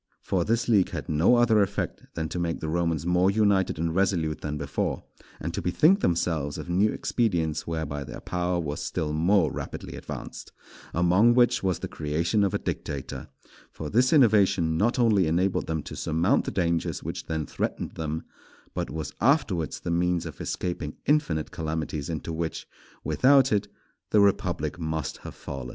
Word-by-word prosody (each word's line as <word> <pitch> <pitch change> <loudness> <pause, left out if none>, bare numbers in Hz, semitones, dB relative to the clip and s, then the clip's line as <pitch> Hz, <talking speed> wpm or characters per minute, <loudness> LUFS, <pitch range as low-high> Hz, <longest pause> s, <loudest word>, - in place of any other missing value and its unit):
For 90 -3 0
this 115 +4 0
league 105 -6 +4
had - - -6
no 80 +10 +4
other 115 -3 +4
effect 100 0 -2
than 80 -1 -2
to 90 - -3
make 85 -1 -1
the 80 - -4
Romans 85 -1 0
more 90 +2 +3
united 100 -4 +2
and 80 +1 -1
resolute 85 -5 0
than 75 0 -3
before, 70 -2 -2 0.4
and 85 +2 -4
to - - -2
bethink 155 - +4
themselves 80 - 0
of - - -7
new 95 +5 +2
expedients 85 -10 -1
whereby 80 -3 -3
their - - -8
power 90 0 -1
was 75 -3 -3
still 75 -1 -2
more 85 +2 +3
rapidly - - -6
advanced; - - -8 0.4
among 90 +8 +4
which 120 -1 +4
was 95 -3 0
the - - -5
creation 85 +7 0
of 100 - +1
a - - +3
dictator; 70 -2 -5 0.4
for 75 -2 -6
this 125 +3 +3
innovation 100 - +4
not 110 +10 +1
only 110 -8 +3
enabled 90 +4 +1
them 80 -2 -2
to - - -8
surmount 85 - +1
the - - -1
dangers 85 -3 -1
which - - -5
then 80 -2 -2
threatened - - -3
them, 80 0 -4 0.5
but - - -3
was 80 0 -5
afterwards 105 - +1
the - - -4
means 85 0 +1
of 80 -4 -8
escaping 85 -4 -3
infinite 90 - +1
calamities 80 -2 -3
into 80 0 -4
which, 80 0 -4 0.4
without 135 0 +4
it, 105 -2 +1 0.4
the 105 - +4
republic 100 -3 +1
must 80 -3 -3
have - - -10
fallen. 70 -3 -7
85 Hz, 170 wpm, -26 LUFS, 80-100 Hz, 0.5 s, league